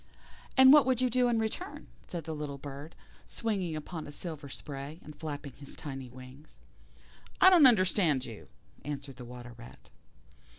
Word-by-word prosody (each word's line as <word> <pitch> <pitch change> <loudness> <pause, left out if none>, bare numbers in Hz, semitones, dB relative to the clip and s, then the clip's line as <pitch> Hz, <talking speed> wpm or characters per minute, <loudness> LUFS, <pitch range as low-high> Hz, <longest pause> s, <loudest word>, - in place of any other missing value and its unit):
"And 265 +1 +9
what 295 -3 +7
would 255 -2 +2
you 255 -1 +2
do 250 +1 +3
in 235 -1 +2
return?" 225 - -3 0.2
said 170 -2 -5
the 160 +1 -5
little 150 -2 -5
bird, 140 +3 -9 0.3
swinging 195 -8 -2
upon 155 +1 -6
a - - -8
silver 150 -2 -7
spray, 140 +3 -7
and 150 - -11
flapping 145 -3 -6
his 140 0 -11
tiny 135 -3 -7
wings. 130 +4 -13 0.8
"I 375 - +8
don't 335 -7 +9
understand 185 - +3
you," 115 -4 -10 0.4
answered 140 -2 -6
the 125 - -8
Water 120 0 -10
rat. 120 0 -14
150 Hz, 165 wpm, -31 LUFS, 135-215 Hz, 0.8 s, And